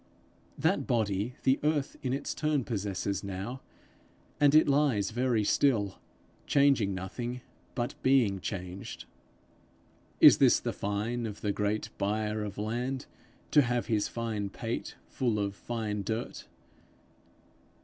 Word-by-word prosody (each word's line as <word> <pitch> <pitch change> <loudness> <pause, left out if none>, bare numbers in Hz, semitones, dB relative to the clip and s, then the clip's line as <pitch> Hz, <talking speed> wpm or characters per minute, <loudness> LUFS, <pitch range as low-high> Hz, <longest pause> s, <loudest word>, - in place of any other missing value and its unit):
That - - +1
body 110 0 0
the 130 +1 +3
earth 150 -2 0
in 130 - -2
its 135 - -2
turn 150 -3 0
possesses 100 -3 -2
now, 100 +7 -5 0.8
and 145 0 +5
it 155 - +6
lies 135 -9 +2
very 120 -2 +1
still, 105 -4 +2 0.5
changing 135 -9 +3
nothing, 120 +7 -5 0.3
but 120 -1 -2
being 125 -8 +3
changed. 90 0 -6 1.1
Is - - +9
this - - +5
the - - -3
fine 110 +4 -2
of 105 -1 -8
the 105 - 0
great 105 +1 -1
buyer 105 +1 -1
of 100 -1 -6
land, 120 +5 -2 0.5
to 150 - +7
have 125 -2 0
his 105 -3 +1
fine 110 -4 -3
pate 115 +3 -4
full 120 -5 -1
of 100 -1 -1
fine 105 -1 -3
dirt? 110 +4 -4
110 Hz, 130 wpm, -30 LUFS, 100-130 Hz, 1.1 s, Is